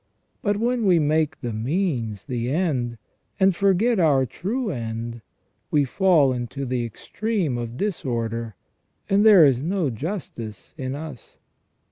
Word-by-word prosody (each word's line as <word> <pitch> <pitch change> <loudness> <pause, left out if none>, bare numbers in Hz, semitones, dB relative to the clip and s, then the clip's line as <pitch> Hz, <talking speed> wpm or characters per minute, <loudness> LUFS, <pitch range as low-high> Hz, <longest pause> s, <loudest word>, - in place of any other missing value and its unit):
But 205 -1 +1
when 235 0 +1
we 180 -2 +5
make 155 0 +1
the 120 -3 -3
means 120 - -1
the 120 -3 -2
end, 135 -7 0 0.4
and 190 0 +5
thus - - -13
forget 200 +3 +3
our 145 -6 +4
true 210 - -3
end, 115 -2 -5 0.5
we 145 -2 +3
fall 155 -3 +3
into 125 +3 -4
the 125 -1 -1
extreme 175 - -2
of 120 0 -5
disorder, 115 - -2 0.6
and 200 +1 +4
there 205 -7 +8
is 130 -3 +3
no 170 -2 0
justice 115 - -6
in 130 -2 -4
us. 145 -5 -9
145 Hz, 140 wpm, -24 LUFS, 120-190 Hz, 0.6 s, there